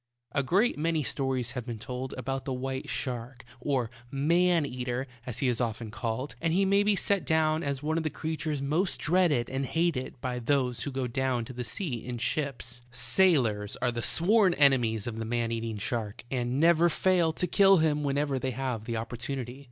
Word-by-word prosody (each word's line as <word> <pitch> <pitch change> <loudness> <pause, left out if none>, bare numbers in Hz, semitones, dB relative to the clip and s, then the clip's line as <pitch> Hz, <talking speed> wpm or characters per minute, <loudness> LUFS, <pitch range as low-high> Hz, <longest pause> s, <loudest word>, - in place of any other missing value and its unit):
A 140 - +1
great 185 - +2
many 160 -1 +1
stories 130 -3 -1
have 125 -3 -4
been 120 -1 -6
told 125 +3 -5
about 135 +1 -3
the 135 - -2
white 130 +1 -4
shark, 125 0 -4
or 125 -3 -1 0.2
"man 165 +4 +2
eater," 125 -1 -3 0.2
as 125 - -4
he 135 - 0
is 120 -2 0
often 115 -2 -3
called, 115 +4 -3
and 165 - +1
he 195 +1 +3
may 200 +1 +4
be 205 0 +3
set 200 -1 +1
down 160 0 +2
as 140 -2 -3
one 160 +2 0
of - - -3
the 155 - 0
creatures 155 -2 -3
most 160 +7 0
dreaded 155 -8 +2
and 135 +1 -2
hated 150 -3 -1
by 125 -1 -3
those 125 -1 0
who 145 - -3
go 130 -1 -2
down 125 -1 -1
to 130 - -9
the 125 0 -4
sea 120 - -4
in 125 -1 -5
ships. 120 -1 -2
Sailors 120 - +2
are 125 - +1
the 120 0 -3
sworn 190 - +5
enemies 120 -7 +3
of 115 -2 -4
the - - -2
man 115 0 -1
eating 115 -1 -3
shark, 110 0 -3
and 125 0 -1
never 170 +1 +5
fail 175 -1 +2
to 180 - -1
kill 195 +2 +5
him 155 -2 +2
whenever 140 -1 0
they 130 - -2
have 125 -3 -3
the 115 -1 -2
opportunity. 120 +3 -5
135 Hz, 200 wpm, -28 LUFS, 120-155 Hz, 0.2 s, sworn